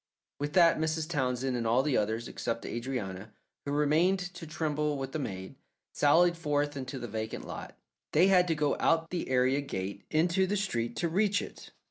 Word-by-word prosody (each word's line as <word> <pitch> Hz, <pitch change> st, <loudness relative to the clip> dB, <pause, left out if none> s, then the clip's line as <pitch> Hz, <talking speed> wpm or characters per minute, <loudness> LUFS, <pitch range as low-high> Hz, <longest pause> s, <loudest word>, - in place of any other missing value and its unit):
With 145 Hz, +1 st, -3 dB
that 170 Hz, -4 st, +5 dB
Mrs. 160 Hz, 0 st, -1 dB
Townsend 130 Hz, -4 st, -1 dB
and 115 Hz, -2 st, -1 dB
all 120 Hz, +4 st, +3 dB
the 145 Hz, -3 st, +1 dB
others, 110 Hz, +3 st, 0 dB
except 115 Hz, 0 st, -4 dB
Adrianna, 110 Hz, -5 st, -4 dB, 0.4 s
who 140 Hz, -, -3 dB
remained 155 Hz, +6 st, +3 dB, 0.2 s
to 175 Hz, -2 st, -9 dB
tremble 150 Hz, -1 st, -1 dB
with 135 Hz, -1 st, -4 dB
the 155 Hz, -, -3 dB
maid, 95 Hz, -8 st, -5 dB, 0.4 s
sallied 170 Hz, +4 st, +4 dB
forth 145 Hz, -3 st, -1 dB
into 130 Hz, 0 st, -5 dB
the 120 Hz, -1 st, -5 dB
vacant 110 Hz, 0 st, -5 dB
lot. -, -, -8 dB, 0.3 s
They 160 Hz, +4 st, +5 dB
had 185 Hz, -2 st, +5 dB
to 165 Hz, -, +1 dB
go 150 Hz, -1 st, +1 dB
out 165 Hz, 0 st, +2 dB
the 175 Hz, -6 st, -3 dB
area 130 Hz, +2 st, +3 dB
gate 100 Hz, -7 st, -5 dB
into 170 Hz, +4 st, +2 dB
the 205 Hz, +2 st, 0 dB
street 120 Hz, -, -2 dB
to 170 Hz, -, 0 dB
reach 200 Hz, +4 st, +2 dB
it. -, -, -9 dB
145 Hz, 185 wpm, -30 LUFS, 125-165 Hz, 0.4 s, that